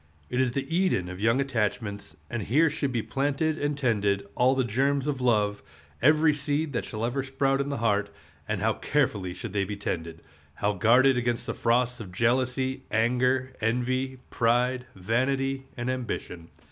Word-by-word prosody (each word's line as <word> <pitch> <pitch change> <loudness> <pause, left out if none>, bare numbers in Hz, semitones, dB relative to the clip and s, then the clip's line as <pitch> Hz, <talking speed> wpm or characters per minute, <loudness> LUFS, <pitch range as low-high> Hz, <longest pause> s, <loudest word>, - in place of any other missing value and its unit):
It 125 +1 +2
is 125 -2 +1
the 135 0 -2
Eden 175 - +1
of 90 +1 -7
young 115 +4 +3
attachments, 105 -5 -2
and 120 -2 -3
here 145 +10 +3
should 140 -2 -2
be 120 -3 -1
planted 145 +3 0
and 145 0 -1
tended 100 -6 +1
all 130 +2 +3
the 130 - +2
germs 135 +4 +1
of 140 -3 -2
love, 105 -4 +2 0.4
every 155 +3 +5
seed 145 +1 -1
that 120 - -2
shall 110 +1 -3
ever 125 +3 -1
sprout 135 +1 0
in 140 - -3
the 140 - -2
heart; 105 -3 +1 0.4
and - - -2
how - - +2
carefully 100 -11 -1
should 110 +1 -7
they 100 -1 +1
be 100 +1 -5
tended! 85 -4 -4 0.3
how 105 +4 0
guarded 125 +6 +4
against 120 -1 -1
the - - -3
frosts 125 +1 +1
of 100 -5 -8
jealousy, 125 +5 0
anger, 125 +3 +1
envy, 130 +3 0
pride, 125 +2 +1
vanity, 135 +7 0
and 120 0 -3
ambition! 115 -9 -4
125 Hz, 170 wpm, -27 LUFS, 110-135 Hz, 0.4 s, every